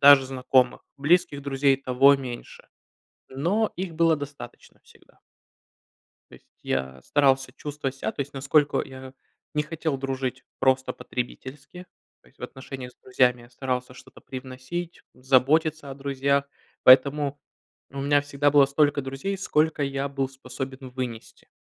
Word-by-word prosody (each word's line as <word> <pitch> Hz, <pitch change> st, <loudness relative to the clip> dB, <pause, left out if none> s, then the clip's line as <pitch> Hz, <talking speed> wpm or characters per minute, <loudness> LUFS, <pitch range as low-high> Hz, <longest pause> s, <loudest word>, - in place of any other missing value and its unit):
Даже 140 Hz, -1 st, +8 dB
знакомых. 130 Hz, -1 st, +2 dB
Близких 145 Hz, -1 st, +2 dB
друзей 135 Hz, 0 st, +2 dB
и 135 Hz, -, -23 dB
того 135 Hz, +2 st, +5 dB
меньше. 125 Hz, -3 st, -8 dB, 0.6 s
Но 175 Hz, +12 st, 0 dB
их 180 Hz, -2 st, -4 dB
было 165 Hz, -1 st, +3 dB
достаточно 145 Hz, 0 st, -10 dB
всегда. -, -, -23 dB, 1.1 s
То -, -, -14 dB
есть -, -, -18 dB, 0.2 s
я 65 Hz, -1 st, -2 dB
старался 135 Hz, -, +2 dB
чувствовать 140 Hz, -1 st, -5 dB
ся. -, -, -3 dB
То -, -, -6 dB
есть 140 Hz, +1 st, -4 dB
насколько 145 Hz, +2 st, +2 dB
я 130 Hz, 0 st, -11 dB, 0.4 s
не 150 Hz, -, +2 dB
хотел 155 Hz, -2 st, -3 dB
дружить 135 Hz, -1 st, -3 dB
просто 130 Hz, 0 st, +2 dB
потребительски, 135 Hz, +7 st, -7 dB, 0.4 s
то -, -, -29 dB
есть -, -, -30 dB
в -, -, -16 dB
отношениях 130 Hz, -1 st, -8 dB
с -, -, -37 dB
друзьями 125 Hz, -1 st, +2 dB
я 120 Hz, -, -17 dB
старался 125 Hz, 0 st, -3 dB
что-то 130 Hz, +1 st, -15 dB
привносить, 130 Hz, +7 st, -7 dB
заботиться 140 Hz, +4 st, +2 dB
о 135 Hz, -, -6 dB
друзьях. 140 Hz, 0 st, 0 dB, 0.4 s
Поэтому 140 Hz, +2 st, +5 dB, 0.5 s
у 140 Hz, -, -6 dB
меня 145 Hz, +1 st, +3 dB
всегда 145 Hz, 0 st, +1 dB
было 145 Hz, -1 st, +6 dB
столько 145 Hz, +1 st, +2 dB
друзей, 135 Hz, +9 st, -4 dB
сколько 155 Hz, -4 st, +1 dB
я 140 Hz, 0 st, -1 dB
был 135 Hz, -1 st, -2 dB
способен 130 Hz, 0 st, -8 dB
вынести. 125 Hz, -3 st, -7 dB
135 Hz, 145 wpm, -25 LUFS, 130-145 Hz, 1.1 s, Даже